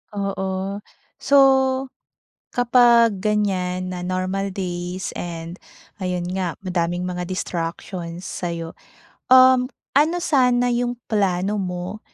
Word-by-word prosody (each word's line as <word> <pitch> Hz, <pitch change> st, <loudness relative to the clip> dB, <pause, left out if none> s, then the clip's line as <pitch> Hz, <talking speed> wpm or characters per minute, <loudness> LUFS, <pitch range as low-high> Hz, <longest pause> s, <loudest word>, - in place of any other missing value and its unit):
Oo. 195 Hz, 0 st, -3 dB, 0.4 s
So, 280 Hz, 0 st, +3 dB, 1.2 s
kapag 235 Hz, -3 st, +4 dB
ganiyan 185 Hz, -3 st, -1 dB
na 180 Hz, -1 st, -5 dB
normal 185 Hz, +2 st, -2 dB
days 180 Hz, -1 st, -4 dB
and 170 Hz, -1 st, -6 dB, 0.5 s
ayun 180 Hz, -1 st, -2 dB
nga 185 Hz, -3 st, -2 dB
madaming 175 Hz, -1 st, -1 dB
mga 180 Hz, -1 st, -4 dB
distractions 170 Hz, -1 st, -4 dB
sa'yo, 170 Hz, -2 st, -5 dB, 0.6 s
um, 255 Hz, -1 st, +7 dB, 0.3 s
ano 315 Hz, +4 st, +3 dB
sana 250 Hz, -4 st, +3 dB
yung 245 Hz, 0 st, 0 dB, 0.2 s
plano 200 Hz, -1 st, +1 dB
mo 180 Hz, +2 st, -4 dB
185 Hz, 100 wpm, -22 LUFS, 180-215 Hz, 1.2 s, um